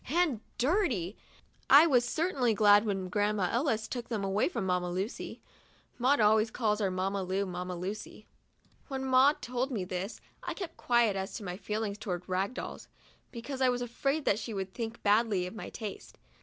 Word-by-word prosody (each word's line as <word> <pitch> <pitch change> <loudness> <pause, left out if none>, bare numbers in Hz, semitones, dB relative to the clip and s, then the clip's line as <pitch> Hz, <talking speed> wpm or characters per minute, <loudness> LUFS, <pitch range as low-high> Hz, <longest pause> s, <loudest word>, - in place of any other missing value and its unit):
And 310 -7 +2 0.2
dirty! 245 - +1 0.3
— - - -35
I 290 +4 +9
was 255 -7 +4
certainly 260 -4 +1
glad 205 +1 +6
when 195 -2 -1
Grandma 205 -1 +1
Ellis 230 -4 0
took 245 -2 -5
them 220 -4 -2
away 195 - +1
from 275 - -3
Mamma 180 -1 0
Lucy." 190 +6 -4 0.6
Maud 260 +3 +3
always 215 +1 +4
calls 215 -2 0
our 195 - +2
Mamma 190 +2 -1
Lu, 190 +2 -1
Mamma 180 0 -4
Lucy. 200 +4 -6 0.6
When 265 -2 -4
Maud 265 +3 +4
told 250 +2 -1
me 210 -8 -2
this, 185 +4 -4 0.2
I - - -4
kept 370 -4 -6
quiet 235 -4 +2
as 190 +1 -4
to 215 - -6
my 180 -2 -4
feel 210 +3 -3
ings 205 -1 -4
toward 180 -5 -4
rag 190 +5 -1
dolls, - - -6 0.4
because 260 +3 -6
I 260 - +5
was 245 0 0
afraid 275 +5 -1
that 205 - +2
she 225 -1 -5
would 190 -1 -4
think 230 -1 -5
badly 205 -3 +3
of 180 - -6
my 220 - -7
taste. 215 -4 -8
215 Hz, 190 wpm, -30 LUFS, 195-250 Hz, 0.6 s, I